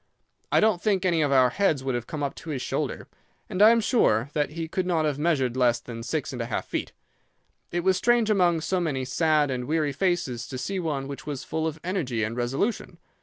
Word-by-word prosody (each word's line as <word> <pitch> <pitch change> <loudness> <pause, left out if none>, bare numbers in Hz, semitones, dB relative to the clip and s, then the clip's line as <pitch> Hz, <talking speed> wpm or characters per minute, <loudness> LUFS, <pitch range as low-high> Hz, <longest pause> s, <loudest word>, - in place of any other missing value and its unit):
I - - +5
don't 215 -5 +3
think 195 -4 +1
any 170 -3 +2
of 145 -2 +1
our 130 -2 +5
heads 155 -6 +1
would 135 -1 -1
have 120 -1 -3
come 150 -2 -4
up 140 - -1
to 165 - -9
his 140 -4 -3
shoulder, - - -3 0.4
and 185 - -2
I 215 - +9
am 230 0 +5
sure 140 - +2
that 150 -1 0
he 165 +1 -5
could 180 +2 -2
not 165 -3 +1
have 145 -2 -1
measured 140 -7 +1
less 120 -2 +3
than 115 -1 -8
six 145 +4 -3
and 125 - -4
a 115 - -3
half 120 - -3
feet. - - -4 0.8
It 175 - -1
was 190 0 +3
strange 235 +1 +3
among 175 -5 +3
so 185 +3 0
many 140 -7 -1
sad 150 +1 +2
and 125 -1 -3
weary 155 0 0
faces 135 -8 -1
to 130 - -6
see 190 +9 -3
one 145 -6 -2
which 140 +1 -8
was 140 -3 -4
full 160 +6 -2
of 160 0 -5
energy 155 - -1
and 110 +2 -2
resolution. 135 - -2
155 Hz, 230 wpm, -26 LUFS, 130-180 Hz, 0.8 s, I